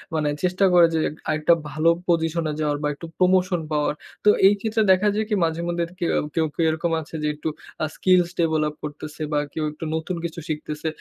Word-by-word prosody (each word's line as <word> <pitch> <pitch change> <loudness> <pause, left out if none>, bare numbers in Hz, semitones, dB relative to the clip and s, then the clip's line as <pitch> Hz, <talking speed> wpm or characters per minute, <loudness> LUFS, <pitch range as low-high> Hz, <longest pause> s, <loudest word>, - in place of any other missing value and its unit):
মানে 155 -1 +1 0.2
চেষ্টা 185 +2 +2
করে 175 -1 +7
যে - - +2 0.3
আরেকটা 155 +2 +3 0.2
ভালো 155 +2 +2 0.2
position 165 -1 +1
এ - - -4
যাওয়ার 150 -1 0
বা - - +2
একটু 145 - -10
promotion 185 -1 +3
পাওয়ার। 150 -1 +1 0.3
তো - - +8 0.2
এই 200 - +6
ক্ষেত্রে 220 +1 0
দেখা 190 +3 +4
যায় 215 +1 0
কি 210 - +2
মাঝে 165 +1 -2
মধ্যে 170 0 -1 0.2
কেউ 170 - 0 0.3
কেউ, 165 -1 +2
কেউ 165 - +1
এরকম 165 +2 -2
আছে 160 +1 -10
যে - - +1
একটু 150 +1 -3 0.3
আ - - +3
skills 180 -2 +3
develop 155 -2 +1
করতেছে 150 +1 -7
বা 150 - +2
কেউ 160 - -2
একটু 150 - -10
নতুন 160 +3 -3
কিছু 165 0 -5
শিখতেছে। 150 0 -4
165 Hz, 205 wpm, -23 LUFS, 155-180 Hz, 0.3 s, তো